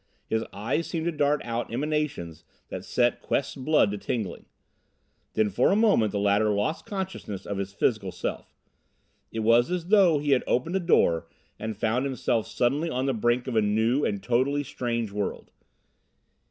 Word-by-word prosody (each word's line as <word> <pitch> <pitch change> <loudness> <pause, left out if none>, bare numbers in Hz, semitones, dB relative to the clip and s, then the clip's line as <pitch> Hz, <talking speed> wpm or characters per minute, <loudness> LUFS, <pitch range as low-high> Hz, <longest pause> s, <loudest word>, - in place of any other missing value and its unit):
His 110 0 -1
eyes 115 +11 -2
seemed 165 -2 -3
to 170 - +1
dart 145 -1 +1
out 115 0 -3
emanations 130 - -2 0.3
that - - -6
set 120 -1 +1
Quest's 140 - -1
blood 135 -5 +2
to 105 - -4
tingling. 110 -1 -4 0.9
Then 110 -1 +1
for - - +3
a - - +3
moment 205 - +3
the - - -2
latter 100 +1 +3
lost 105 +10 -1
consciousness 190 - -5
of 100 -1 -3
his 100 0 -3
physical 100 -1 0
self. - - -5 0.8
It 115 - -3
was 115 +2 +4
as 180 -1 -3
though 195 -7 +6
he 145 0 -1
had 130 - +4
opened 160 +9 0
a - - +3
door 85 - +2 0.3
and 110 0 -4
found 115 +5 0
himself 120 -4 -1
suddenly 140 +7 0
on 130 -3 -1
the 135 - +1
brink 120 +2 +1
of 130 -3 -4
a 110 - +4
new 110 +6 +2
and 100 -2 -1
totally 130 +6 +1
strange 120 -5 -3
world. 100 -1 -4
120 Hz, 175 wpm, -26 LUFS, 105-150 Hz, 0.9 s, though